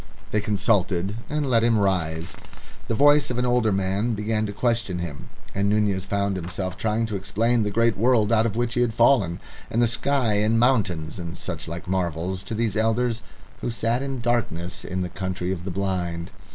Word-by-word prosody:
They 105 - +1
consulted 100 -2 +1
and 150 -1 -1
let 115 -3 +3
him 115 -1 +3
rise. 85 -4 0 0.5
The 115 - 0
voice 145 +3 +5
of 125 - -2
an 125 - +1
older 120 -3 +2
man 95 +4 0
began 110 +1 -1
to - - -4
question 110 -3 0
him, 85 -5 -6 0.2
and 100 +1 +1
Nunez 100 -3 +1
found 100 -1 0
himself 90 +1 -4
trying 110 +1 0
to 110 -2 -4
explain 115 +5 +1
the 105 - 0
great 115 +1 +2
world 115 0 +3
out 115 0 +4
of 110 - -4
which 120 0 0
he 120 - +1
had 115 -3 +1
fallen, 115 -9 +4 0.3
and 115 - 0
the 120 - +4
sky 120 0 +1
and 105 +2 +2
mountains 95 -10 +1
and 85 -1 -6
sight 95 - -3
and 80 - -8
such - - -5
like 85 +2 -6
marvels, 90 0 -1
to 100 +3 -5
these 110 -2 0
elders 115 +1 +1 0.4
who - - -3
sat 115 +1 0
in 135 -2 -3
darkness 110 -8 -1
in 90 +1 -3
the 90 - -1
Country 95 0 -3
of 90 -2 -4
the - - -3
Blind. 90 -2 -2
105 Hz, 205 wpm, -24 LUFS, 95-115 Hz, 0.5 s, voice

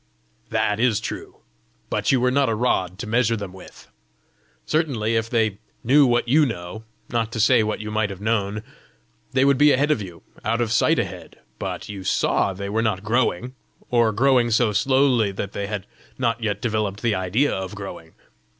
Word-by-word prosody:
"That 105 +1 0
is 115 -3 +2
true. 115 - -7 0.5
But - - +1
you 130 - +3
were 125 +1 +2
not 140 -1 +2
a 110 - 0
rod 95 -6 0
to 110 - -5
measure 115 +1 +1
them 100 -3 -7
with! 95 - -14 0.8
Certainly, 130 -9 0
if 115 0 0
they 110 -4 0 0.2
knew 140 +3 +5
what 120 0 +1
you 150 +6 +5
know, 110 -3 -4 0.2
not 115 -2 -1
to 110 - -3
say 110 - +5
what 110 0 -2
you 105 0 -5
might 110 -1 0
have 95 -2 -7
known, 105 -1 -1 0.7
they 130 +1 +3
would 140 -1 +3
be 145 0 +6
ahead 145 +3 +2
of 130 - +1
you 90 -4 -9 0.2
out 115 +2 0
of 115 -2 0
sight 115 - +3
ahead! - - -5 0.2
but - - -5
you 100 -2 -7
saw 95 - +1
they 100 +1 -6
were 110 +3 0
not 105 -4 -1
growing 120 +1 0 0.4
or 120 -2 +3
growing 125 +1 +3
so 110 0 +3
slowly 130 -1 +2
that 100 0 -5
they 100 0 -4
had 105 -3 -4 0.3
not 115 0 0
yet 105 -3 -2
developed 110 -3 -1
the 115 -2 +2
idea 100 +9 +1
of 95 +1 -4
growing! 95 -5 -9
110 Hz, 190 wpm, -23 LUFS, 100-125 Hz, 0.8 s, be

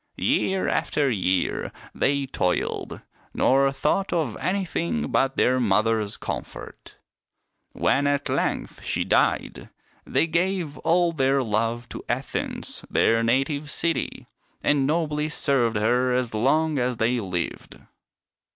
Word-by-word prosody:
Year 190 0 +1
after 140 -3 +1
year 95 -4 0 0.2
they 140 0 +1
toiled, 90 -8 -2 0.3
nor 135 +1 +3
thought 150 +8 0
of 155 -10 -1
anything 170 - -2
but 135 0 +1
their 130 +1 +3
mother's 110 -1 +1
comfort. - - -7 0.8
When 140 +1 +2
at 145 0 0
length - - -2
she - - 0
died, - - 0 0.3
they - - +1
gave 170 -2 -1
all 170 +1 +2
their 135 -3 +2
love 115 +2 -1
to - - -7
Athens, 130 +3 -3
their 115 0 +3
native 135 +5 0
city, 165 +2 -2 0.4
and 140 -2 +2
nobly 150 -1 0
served 135 -7 +1
her 120 +4 +2
as 125 -2 0
long 145 +6 +2
as 125 -1 0
they 120 +2 +1
lived." 90 -5 -4
135 Hz, 120 wpm, -24 LUFS, 115-155 Hz, 0.8 s, nor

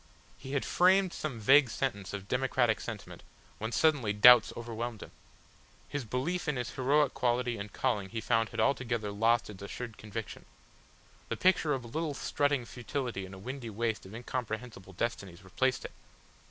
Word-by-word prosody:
He 135 - -9
had 140 - 0
framed 185 0 +4
some 135 -7 -4
vague 135 +4 +6
sentence 100 -7 -3
of 100 -1 -6
democratic 125 -2 +1
sentiment 110 -4 -7 0.4
when 110 +2 -3
suddenly 130 -5 +2
doubts 125 +4 +8
overwhelmed 115 -1 -5
him. - - -12 0.8
His 145 -3 -4
belief 155 +11 -2
in 150 - +1
his 125 -2 -3
heroic 140 +2 +2
quality 120 0 0
and 100 +1 -6
calling 105 -7 -1
he 115 - -4
found 115 0 +1
had - - -6
altogether 120 -6 0
lost 115 +2 +2
its 100 -1 -12
assured 110 +2 -7
conviction. 110 +1 -7 0.8
The - - -2
picture 180 -5 +3
of 130 - -6
a - - -9
little 155 +4 -3
strutting 145 -2 0
futility 120 -5 -4
in 95 - -12
a - - -11
windy 125 +4 -6
waste 110 -1 -2
of 100 - -10
incomprehensible 115 -4 -5
destinies 100 -4 -4
replaced 120 +7 0
it. - - -6
120 Hz, 165 wpm, -31 LUFS, 110-135 Hz, 0.8 s, doubts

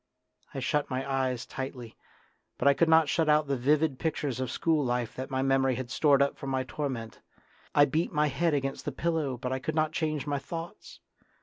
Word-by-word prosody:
I - - -2
shut 145 +3 0
my 130 +1 -3
eyes 130 -3 -1
tightly, 130 -3 -7 0.6
but 130 - +1
I 140 - +7
could 165 +3 +2
not 160 -1 +6
shut 160 +1 +1
out 150 0 +4
the 140 -1 0
vivid 145 +2 +1
pictures 145 -6 -2
of 130 -2 -2
school 160 +3 +1
life 120 -2 -1
that 130 +1 -5
my 130 0 -1
memory 135 -1 +2
had 125 -1 -5
stored 140 0 +4
up 140 - -2
for 140 - -6
my 130 -1 0
torment; 125 -4 -5 0.6
I 145 - +7
beat 155 +5 -1
my 150 -1 +2
head 150 +3 +1
against 135 -1 -3
the 145 - -2
pillow, 155 -3 -1
but 125 +1 -4
I 130 - -2
could 155 +4 -3
not 155 -1 +1
change 155 -3 -2
my 145 -1 -1
thoughts. 165 +4 -8
140 Hz, 210 wpm, -29 LUFS, 130-155 Hz, 0.6 s, I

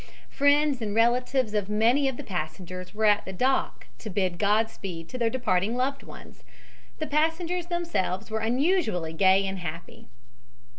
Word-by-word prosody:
Friends 285 -1 +3
and 210 -2 -3
relatives 245 0 +2
of 205 -2 -1
many 235 +7 +3
of 265 -2 -2
the - - -7
passengers 180 +1 -5
were 220 0 +1
at 210 -1 +4
the 190 - -7
dock 255 +8 0
to 220 - -7
bid 185 -3 -1
Godspeed 200 -5 -1
to 255 - -6
their 230 -1 +2
departing 220 -3 0
loved 275 +2 -1
ones. - - -13 0.5
The 310 - -3
passengers 325 +4 0
themselves 335 - -2
were 220 - -1
unusually 225 - 0
gay 190 +3 +4
and 190 0 -4
happy. 170 0 -8
220 Hz, 155 wpm, -26 LUFS, 190-270 Hz, 0.5 s, at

